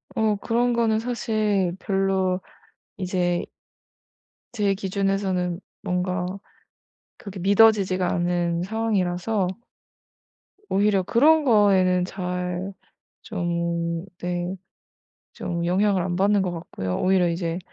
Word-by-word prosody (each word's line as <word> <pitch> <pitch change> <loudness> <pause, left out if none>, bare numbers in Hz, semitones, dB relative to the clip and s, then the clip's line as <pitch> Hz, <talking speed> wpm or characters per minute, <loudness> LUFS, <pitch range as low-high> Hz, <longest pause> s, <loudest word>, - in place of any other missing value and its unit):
어 220 -2 +2
그런 240 +4 +1
거는 225 -2 +2
사실 215 -6 0
별로 190 -1 0 0.6
이제 180 -2 -1 1.1
제 205 -4 +1
기준에서는 195 -2 -1 0.2
뭔가 180 0 -1 0.9
그렇게 200 -5 -9
믿어지지가 195 -2 +4
않는 175 -1 0
상황이라서 200 -2 0 1.2
오히려 200 -1 +2
그런 305 - +4
거에는 195 -7 +4
잘 180 0 -4 0.5
좀 170 -3 -2
네, 175 +1 -3 0.8
좀 170 -1 -3
영향을 190 +2 +2
안 175 0 -2
받는 200 +2 +3
것 185 - -1
같고요. 130 - -4
오히려 185 -2 +3
이제 170 0 -2
185 Hz, 205 characters per minute, -24 LUFS, 175-205 Hz, 1.2 s, 믿어지지가